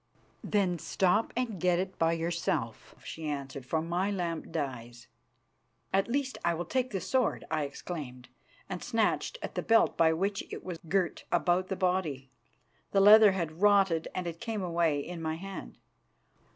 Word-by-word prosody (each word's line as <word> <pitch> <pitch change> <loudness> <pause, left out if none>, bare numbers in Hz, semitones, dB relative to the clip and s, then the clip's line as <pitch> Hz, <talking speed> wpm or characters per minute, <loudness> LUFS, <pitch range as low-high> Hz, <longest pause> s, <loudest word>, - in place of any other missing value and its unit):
"Then 185 -5 +1
stop 190 +7 +1
and 230 -7 -2
get 180 -1 +3
it 190 +1 -3
by 165 0 +3
yourself," 165 -9 -2
she 160 -1 -5
answered, 135 -2 -5
"for 160 +3 0
my 175 +4 0
lamp 175 -5 -3
dies." 120 -5 -5 0.9
"At 195 0 +3
least, 265 +2 -2
I 170 -1 +2
will 175 +2 -4
take 255 -1 -1
the 195 - -2
sword," 255 +3 0
I 150 - 0
exclaimed, 140 -4 -7 0.4
and 180 - -5
snatched 230 - 0
at - - -5
the - - -2
belt 225 0 +3
by 165 -1 +5
which 195 +4 -1
it - - -6
was 175 -3 -6
girt 185 -1 0
about 175 +1 +2
the 190 - -2
body. 180 -8 -1 0.6
The 195 - +4
leather 210 0 +8
had 170 -2 -4
rotted, 195 -5 +4
and 185 - -2
it 165 -1 -6
came 220 -4 -3
away 165 -4 +1
in 170 +3 -7
my 160 0 -2
hand. 195 +3 -8
175 Hz, 165 wpm, -30 LUFS, 160-195 Hz, 0.9 s, leather